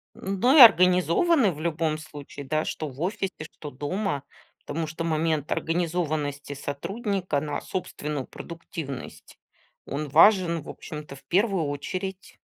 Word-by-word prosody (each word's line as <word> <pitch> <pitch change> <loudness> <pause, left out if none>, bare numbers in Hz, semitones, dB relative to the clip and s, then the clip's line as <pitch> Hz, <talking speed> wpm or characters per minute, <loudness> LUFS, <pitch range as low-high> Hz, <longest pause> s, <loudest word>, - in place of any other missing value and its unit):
Ну 195 +9 +2
и - - +9
организованы 185 - +6
в 150 - -10
любом 160 -1 -1
случае, 145 -2 -9
да, 155 +2 0
что 155 - -4
в 135 +1 -11
офисе, 195 +1 -1 0.2
что 150 - -8
дома. 145 +2 -2 0.4
Потому 165 +1 -2
что 160 +2 -5
момент 155 -2 0
организованности 155 -4 -1
сотрудника 175 - -2
на 150 -1 -3
собственную 150 -6 -4
продуктивность, 165 -5 -8 0.5
он 145 +1 -3
важен, 170 +1 +5
в - - -14
общем-то, 150 -2 -8
в 135 - -17
первую 190 +1 +2
очередь. 185 +7 -5
165 Hz, 130 wpm, -26 LUFS, 145-185 Hz, 0.5 s, и